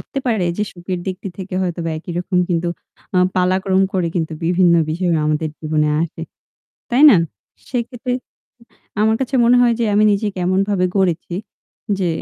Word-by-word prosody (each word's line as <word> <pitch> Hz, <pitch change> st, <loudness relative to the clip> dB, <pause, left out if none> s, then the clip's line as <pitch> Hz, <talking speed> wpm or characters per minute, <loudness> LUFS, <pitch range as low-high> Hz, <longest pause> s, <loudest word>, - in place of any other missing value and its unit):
হতে 275 Hz, -, -6 dB
পারে 215 Hz, -7 st, +1 dB
যে 210 Hz, -, 0 dB
সুখের 180 Hz, 0 st, -5 dB
দিকটি 190 Hz, +1 st, -4 dB
থেকে 190 Hz, -1 st, -6 dB
হয়তো 175 Hz, -1 st, -2 dB
বা 165 Hz, -, -1 dB
একই 175 Hz, +2 st, -7 dB
রকম, 180 Hz, +1 st, -1 dB
কিন্তু 170 Hz, 0 st, 0 dB, 0.5 s
আ -, -, +5 dB, 0.2 s
পালাক্রম 185 Hz, +1 st, +2 dB
করে 180 Hz, -3 st, 0 dB
কিন্তু 160 Hz, -1 st, -1 dB
বিভিন্ন 175 Hz, 0 st, +4 dB, 0.2 s
বিষয় 175 Hz, +1 st, 0 dB
আমাদের 155 Hz, +1 st, 0 dB
জীবনে 155 Hz, -1 st, 0 dB
আসে। 165 Hz, 0 st, -5 dB, 0.7 s
তাই 250 Hz, +4 st, +3 dB
না? -, -, +6 dB, 0.5 s
সেক্ষেত্রে 245 Hz, 0 st, -3 dB, 0.9 s
আমার 220 Hz, +1 st, +3 dB
কাছে 265 Hz, +1 st, -2 dB
মনে 245 Hz, +1 st, +5 dB
হয় 240 Hz, -1 st, +4 dB
যে, -, -, +2 dB
আমি 210 Hz, -, +4 dB
নিজে 205 Hz, +1 st, 0 dB
কেমনভাবে 185 Hz, +1 st, +1 dB
গড়েছি 175 Hz, -2 st, 0 dB, 0.6 s
যে 180 Hz, -3 st, 0 dB
185 Hz, 160 wpm, -19 LUFS, 175-210 Hz, 0.9 s, না